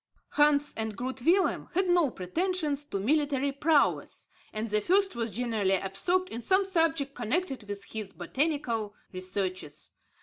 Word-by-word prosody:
Hans 295 0 +3
and 220 -1 -3
Groot 260 +1 -4
Willem 365 +8 +2
had 375 +1 +3
no 350 -5 +4
pretensions 295 - -1
to 200 - -3
military 280 +3 +1
prowess, 290 +2 +1 0.2
and 215 +1 -3
the 210 0 +1
first 385 - +2
was 230 -1 -1
generally 215 -3 0
absorbed 200 - 0
in 230 - -4
some 380 +8 +3
subject 325 -6 +1
connected 265 +5 -2
with 200 -1 -5
his 215 -3 -6
botanical 235 -6 -2 0.2
researches. 185 -4 -4
270 Hz, 140 wpm, -29 LUFS, 210-325 Hz, 0.2 s, no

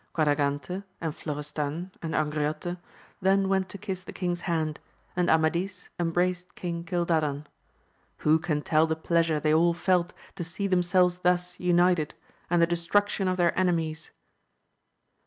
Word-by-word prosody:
Quadragante, 145 +3 0 0.2
and 160 -3 -2
Flo 150 -3 -4
restan, 150 +4 -4
and 160 -1 -3
Angriote 155 +3 -1 0.4
then 195 +1 +3
went 190 -1 +1
to - - -8
kiss 190 -2 -5
the - - -8
king's 175 -1 -2
hand, 160 -4 -1 0.4
and 180 -1 +1
Amadis 170 +4 +1
embraced 175 +1 0
King 170 -2 -4
Cildadan. 160 -4 0 0.8
Who 155 +1 +5
can 155 -3 -1
tell 160 0 +3
the 160 - 0
pleasure 165 -1 +1
they 155 +1 +2
all 170 +2 +4
felt 180 0 +1 0.2
to - - -2
see 170 +4 -4
themselves 180 -1 +3
thus 180 0 0
united, 175 -3 +2 0.3
and 175 0 +3
the 170 +1 +2
destruction 195 +3 +1
of 185 0 0
their 175 -1 +2
enemies 165 -3 0
170 Hz, 145 wpm, -27 LUFS, 155-180 Hz, 0.8 s, Who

